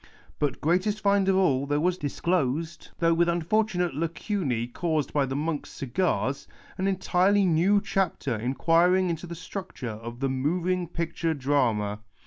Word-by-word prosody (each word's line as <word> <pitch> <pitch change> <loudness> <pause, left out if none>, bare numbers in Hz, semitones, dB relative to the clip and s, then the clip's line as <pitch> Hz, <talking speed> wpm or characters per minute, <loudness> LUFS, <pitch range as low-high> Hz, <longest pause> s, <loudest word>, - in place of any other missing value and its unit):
But, 145 -3 -1
greatest 185 +6 +1
find 200 0 +2
of 190 - +3
all, 140 -8 +2
there 145 +1 +1
was 180 +3 +1
disclosed 155 +1 -1
— - - -37
though 165 0 +3
with 170 +1 +3
imfor 170 +6 +2
tunate 180 -5 -1
lacuncc 150 - -2
caused 160 -5 -1
by 145 -2 +2
the 135 - -3
monks' 150 +1 -2
cigars 140 -1 -1 0.2
— - - -24
an 190 - +1
entirely 195 +1 +2
new 180 +4 +4
chapter 195 - -1
inquiring 170 +10 +2
into 170 +2 -5
the 170 - -6
structure 180 - -6
of 120 +1 -8
the 135 - 0
Moving 175 +7 0
Picture 165 0 -2
Drama. 120 -7 0
165 Hz, 160 wpm, -27 LUFS, 140-185 Hz, 0.2 s, new